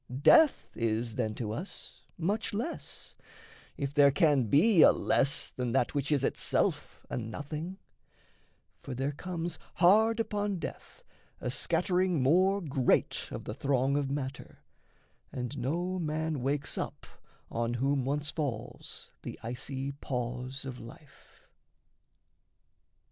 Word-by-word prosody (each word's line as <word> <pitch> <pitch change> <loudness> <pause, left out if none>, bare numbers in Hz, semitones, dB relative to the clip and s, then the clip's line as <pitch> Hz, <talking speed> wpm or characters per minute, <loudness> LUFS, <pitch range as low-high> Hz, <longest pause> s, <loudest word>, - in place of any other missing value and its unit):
Death 315 -3 +5
is, 115 0 -1
then, 110 -3 -2
to 110 -2 -3
us 170 - -6 0.2
Much 205 +5 -1
less 300 +11 -5 0.6
if 140 -1 -3
there 145 -1 +7
can 145 -4 +3
be 160 - +5
a - - +9
less 140 +1 +1
than 125 -2 -3
that 120 - +2
Which 145 0 -1
is 140 -3 +2
itself - - 0
a - - -4
nothing: 150 - -5 1.0
for 130 - -6
there 135 +3 -1
comes 170 +2 -4 0.2
Hard 220 +6 +5
upon 205 -3 -1
death - - -8 0.4
a - - -2
scattering 180 -6 +1
more 185 +8 +4
great 135 -6 +1
Of - - -6
the - - -5
throng 135 +2 +1
of 145 -2 0
matter, 135 -1 -5 0.7
and 125 +2 -4
no 175 +8 -1
man 155 -2 -2
wakes 140 +2 -1
up - - -5 0.5
On 120 +1 -1
whom 135 +2 +1
once 145 +3 -1
falls 140 -9 -5
the - - -7
icy 130 +3 -4
pause 125 0 -4
of 130 -2 -6
life. 130 +5 -15
140 Hz, 125 wpm, -30 LUFS, 125-175 Hz, 1.0 s, a